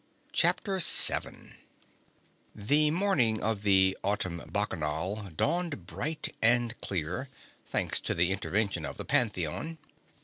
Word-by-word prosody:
CHAPTER 195 -2 +1
SEVEN 175 - +2 1.0
The 145 +9 +4
morning 150 - +2
of 110 -2 -1
the 95 -2 +4
Autumn 90 -4 -1
Bacchanal 95 +1 -2
dawned 170 - -1
bright 150 - -4
and 120 0 +2
clear 95 - -3 0.4
thanks - - 0
to - - -3
the 85 +2 +2
intervention 95 -1 -1
of - - -6
the - - -6
Pantheon. 110 - -1
105 Hz, 110 wpm, -29 LUFS, 95-130 Hz, 1.0 s, The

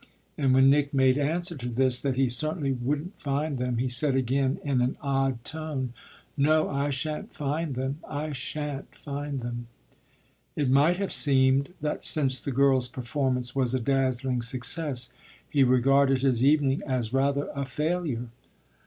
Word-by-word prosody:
And 135 -3 +1
when 130 0 +6
Nick 145 0 +1
made 130 0 +3
answer 170 +4 -1
to 125 -2 -5
this 125 +1 +2
that 135 -2 -1
he 135 0 +2
certainly 140 +4 0
wouldn't 145 +8 -3
find 145 0 -2
them 125 -1 -1
he 125 +2 0
said 130 +3 +3
again 135 +1 0
in 135 -4 0
an 125 +2 0
odd 135 -3 -1
tone: 150 -5 -4 0.4
"No, 155 +2 +3
I 140 +1 -1
shan't 150 +3 -3
find 150 0 -2
them 130 +3 -3
I 150 +1 -4
shan't 145 +2 -5
find 145 -1 -5
them." 120 0 -5 0.9
It 140 -4 0
might 150 +6 +4
have 195 -1 -2
seemed 135 +3 +3
that 150 0 -2
since 135 -4 +2
the 140 - -4
girl's 135 -1 +3
performance 125 0 -2
was 130 -2 +1
a - - 0
dazzling 130 0 0
success 130 +1 -1 0.3
he 140 -2 +3
regarded 135 +1 +3
his 130 -3 +2
evening 145 -1 +3
as 125 -3 -2
rather 140 +1 +1
a 140 - -3
failure. 145 -3 -2
135 Hz, 160 wpm, -27 LUFS, 130-145 Hz, 0.9 s, when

